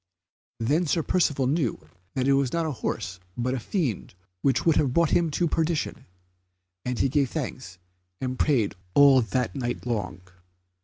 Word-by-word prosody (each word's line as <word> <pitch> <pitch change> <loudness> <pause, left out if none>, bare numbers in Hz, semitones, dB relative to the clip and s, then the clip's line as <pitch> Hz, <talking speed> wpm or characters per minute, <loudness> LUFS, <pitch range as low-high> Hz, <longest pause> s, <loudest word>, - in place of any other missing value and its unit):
Then 150 +10 +1
Sir 165 +2 +1
Percivale 145 -7 +1
knew 130 - -1 0.3
that 130 -1 0
it 140 - +5
was 135 -2 +2
not 165 -1 0
a 155 - -1
horse 95 -7 -4 0.2
but 125 +2 0
a 130 - -1
fiend 120 - -2 0.3
which 135 -3 +1
would 165 -2 +4
have 140 -5 +1
brought 170 -2 +3
him 170 -2 +3
to 170 +3 0
perdition, 160 0 -1 0.8
and 125 -1 -2
he - - +2
gave 140 0 +1
thanks 130 - -5 0.4
and 130 -1 -3
prayed 125 -10 +2 0.2
all 140 -2 +7
that 125 +3 -1
night 120 -3 -3
long. 100 -6 -3
135 Hz, 165 wpm, -26 LUFS, 120-155 Hz, 0.8 s, all